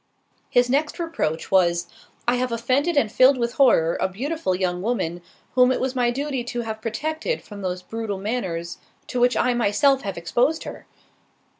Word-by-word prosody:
His 245 0 +3
next 285 +4 0
reproach 330 - -3
was—"I 190 +6 0
have 250 0 -1
offended 260 +8 0
and 220 -7 +2
filled 260 +3 +5
with 235 -1 -1
horror, 170 - +3
a - - +1
beautiful 260 - -2
young 180 -1 -1
woman, 185 -6 -2 0.3
whom 250 0 +5
it - - 0
was 260 0 -1
my 245 -1 +2
duty 270 0 -2
to 240 0 -4
have 220 -1 -5
protected 315 - -3
from 205 -1 -10
those 180 -1 -3
brutal 225 -2 -4
manners, 190 -5 -3 0.3
to 250 - -3
which 245 +1 +3
I 250 - +2
myself 240 +4 +3
have 195 -3 -5
exposed 245 - 0
her." - - -9
240 Hz, 170 wpm, -23 LUFS, 190-260 Hz, 0.3 s, filled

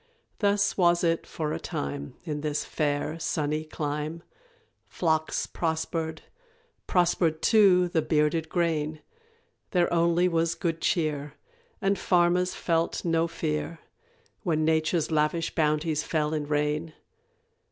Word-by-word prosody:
Thus 200 -1 +2
was 175 -2 +3
it 165 -1 +1
for 155 -1 -3
a - - -3
time 70 0 -5
In 150 -4 -4
this 150 -1 -2
fair 150 +2 -1
sunny 155 -1 -1
clime 155 +1 -4 0.6
Flocks 160 -2 0
prospered; 160 -1 -3 0.6
prospered, 170 -3 +2
too, 195 -5 +5
the 165 -2 +1
bearded 155 +1 +1
grain, 155 -3 -1 0.7
There 175 -3 +1
only 170 +1 +3
was 165 -1 +1
good 165 -2 -2
cheer, 150 -3 -1 0.5
And 195 0 +2
farmers 180 0 +2
felt 165 0 -1
no 165 0 +2
fear 75 - -3 0.6
When 155 -2 0
Nature's 160 +1 +1
lavish 155 +2 +1
bounties 155 -1 +1
fell 155 -1 -1
in 150 -2 -2
rain. 150 +2 -1
160 Hz, 120 wpm, -27 LUFS, 150-170 Hz, 0.7 s, too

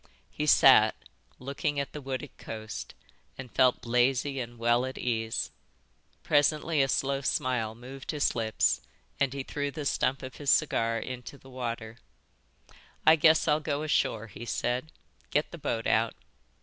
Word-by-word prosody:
He 150 - -3
sat, - - +7 0.4
looking 140 +2 -2
at 140 - -4
the 150 - -6
wooded 135 +1 -5
coast, 110 -1 -7 0.4
and 130 -3 -8
felt 125 +4 +3
lazy 130 +3 +1
and 120 -1 -6
well 120 +1 +2
at 130 0 -5
ease. 115 -2 -2 0.7
Presently 150 +1 +2
a 135 - +3
slow 135 +1 0
smile 125 -4 -1
moved 130 +3 -10
his 150 -2 +1
lips 110 - +1 0.4
and 140 -2 +2
he 135 0 -4
threw 145 +1 -3
the 150 +1 -6
stump 135 -1 0
of 130 -1 -8
his 145 -2 -3
cigar 115 -7 +2
into 125 +4 -7
the 135 -1 -16
water. 115 -3 -5 1.1
"I 160 - +8
guess 160 +1 +4
I'll 150 0 +3
go 150 -1 -2
ashore," 115 -7 0
he 115 +1 -10
said. 125 +5 -2 0.4
"Get 150 - 0
the 170 - -9
boat 115 -5 -2
out." 115 +1 +2
130 Hz, 155 wpm, -29 LUFS, 115-145 Hz, 1.1 s, I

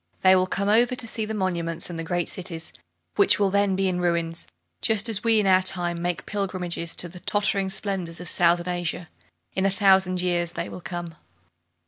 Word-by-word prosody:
They 185 0 +6
will 185 0 +2
come 200 +2 -2
over 240 +4 +3
to 240 - -4
see 220 -1 -3
the 220 +1 -4
monuments 170 -4 -1
and 170 -2 -6
the - - -3
great 175 +1 -1
cities, 170 -3 -5 0.4
which - - +4
will 200 -2 +1
then 200 -1 +2
be 195 0 +1
in 180 -1 -1
ruins, 170 -1 -1 0.3
just 220 0 +2
as 220 -3 0
we 225 -1 +4
in 210 - +1
our 185 -1 +5
time 175 -2 0
make 175 -5 -2
pilgrimages 185 -4 -3
to 175 - 0
the 180 +1 -11
tottering 200 0 +1
splendors 190 -4 -2
of 180 - -5
Southern 175 +2 +3
Asia. 175 -1 -4 0.4
In 190 - -1
a 195 - +3
thousand 190 -2 +3
years 175 -1 0
they 170 0 -4
will 180 - -9
come! 175 -1 -6
185 Hz, 200 wpm, -24 LUFS, 175-195 Hz, 0.4 s, They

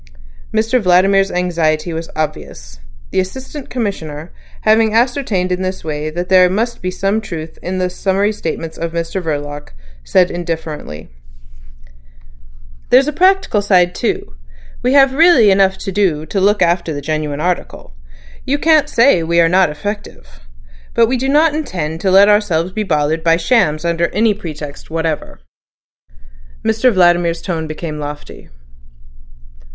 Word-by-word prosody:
Mr 225 +3 +1
Vladimir's 195 +1 +3
anxiety 170 -2 -1
was 165 0 -5
obvious. - - -5 0.3
The - - 0
Assistant 265 +9 -6
Commissioner 170 -9 -5 0.3
having 220 0 +3
ascertained 230 -7 0
in 180 +1 -1
this 185 0 -4
way 150 -1 -4
that 175 +3 -4
there 185 -1 +5
must 230 +5 -2
be 185 - -2
some 195 +4 -1
truth 165 -6 -8
in 185 +1 -4
the 185 0 0
summary 195 +3 0
statements 165 -4 -5
of 170 0 -4
Mr 170 +3 -3
Verloc, 145 - -5 0.3
said 180 - +2
indifferently: 160 - -6 1.8
"There's 265 +3 +5
a 300 - -1
practical 370 - +2
side 180 -3 +3
too. - - -3 0.5
We 250 - +1
have 270 -1 +5
really 280 - +5
enough 190 0 +3
to 195 - -5
do 180 -6 0
to 195 +4 -2
look 205 +2 +3
after 170 -1 0
the - - -4
genuine 150 -1 -3
article. 175 - -3 0.5
You 285 - 0
can't 305 -1 +3
say 235 - +4
we 170 +1 +1
are 165 - +5
not 180 0 +3
effective. 150 - -7 0.6
But 230 - +5
we 260 - +1
don't 290 +5 +2
intend 165 - -4
to 195 - +1
let 195 +2 +6
ourselves 195 -5 +1
be 215 - -3
bothered 160 -4 0
by 165 0 +3
shams 165 -4 +1
under 170 0 +1
any 215 +4 +1
pretext 150 -7 -9
whatever." 160 - -4 1.2
Mr 225 +3 +2
Vladimir's 175 -3 +2
tone 165 -4 -3
became 155 0 -6
lofty. 145 0 -8
180 Hz, 145 wpm, -16 LUFS, 160-215 Hz, 1.8 s, let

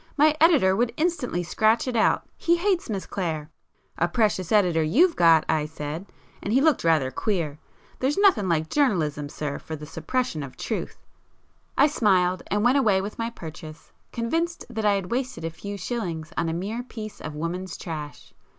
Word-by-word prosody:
My 305 +1 +5
editor 290 - +5
would 235 +2 0
instantly 305 - 0
scratch 220 +7 +2
it 250 - -2
out—he 335 +8 +2
hates 360 -4 0
Miss 195 -3 -3
Clare.' 160 -5 -3 0.5
'A 175 - +3
precious 190 -2 0
editor 180 -6 +4
you've 305 - +4
got!' 165 -2 +5
I 155 -1 +1
said, 155 +4 -6 0.3
and 200 - -3
he 255 - +4
looked 310 -1 +3
rather 155 -6 +3
queer. 165 -8 -2 0.4
There's 270 +3 0
nothing 380 - +4
like 160 -2 +1
journalism, 160 - +1
sir, 145 -1 -4
for 160 - -6
the 150 0 -8
suppression 160 - -2
of 135 -2 -8
truth!" - - -4 0.8
I 280 - +7
smiled, 185 - +2
and 205 +1 0
went 250 +4 +4
away 210 -7 +3
with 200 +4 -6
my 230 0 -1
purchase, 160 -6 -10 0.2
convinced 330 +9 -2
that 220 -2 -3
I 205 - +5
had 195 -2 -3
wasted 250 -6 -2
a 165 - -2
few 200 +5 -7
shillings 175 -7 -4
on 165 - 0
a - - -2
mere 200 +8 -3
piece 220 -4 -8
of 155 -1 -6
woman's 170 +3 -4
trash. 150 -3 -7
195 Hz, 180 wpm, -25 LUFS, 160-245 Hz, 0.8 s, I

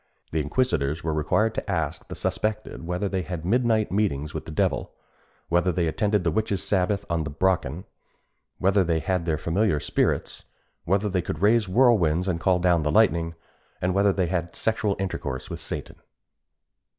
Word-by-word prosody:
The 80 - 0
inquisitors 75 - 0
were 80 -1 -1
required 105 +9 +1
to - - -5
ask 80 -5 -2
the - - -7
suspected 110 -5 -2
whether 90 +3 -1
they 95 -1 -1
had 85 -1 -5
midnight 110 +1 +2
meetings 75 -8 0
with - - -5
the - - -7
devil? 75 - -1 0.5
whether 90 +2 +2
they 85 0 0
attended 100 +5 +1
the 85 - +1
witches' 100 +1 -1
sabbath 100 +1 +1
on 85 -1 0
the 75 - -4
Brocken? 85 0 0 0.7
whether 95 +1 +3
they 85 -2 +1
had 90 +1 -1
their 80 -2 +1
familiar 85 +1 +1
spirits? - - -1 0.4
whether 100 +4 +1
they 95 -2 0
could 80 0 -5
raise 105 -1 +4
whirlwinds 90 -7 +3
and 85 -3 0
call 90 +2 +3
down 90 -2 +3
the 75 - 0
lightning? 85 -4 +3 0.4
and 90 +1 0
whether 100 +1 +4
they 95 -1 0
had 85 -1 -1
had 85 - -19
sexual 110 -2 0
intercourse 70 -9 -4
with - - -5
Satan? - - -6
90 Hz, 175 wpm, -25 LUFS, 80-100 Hz, 0.7 s, raise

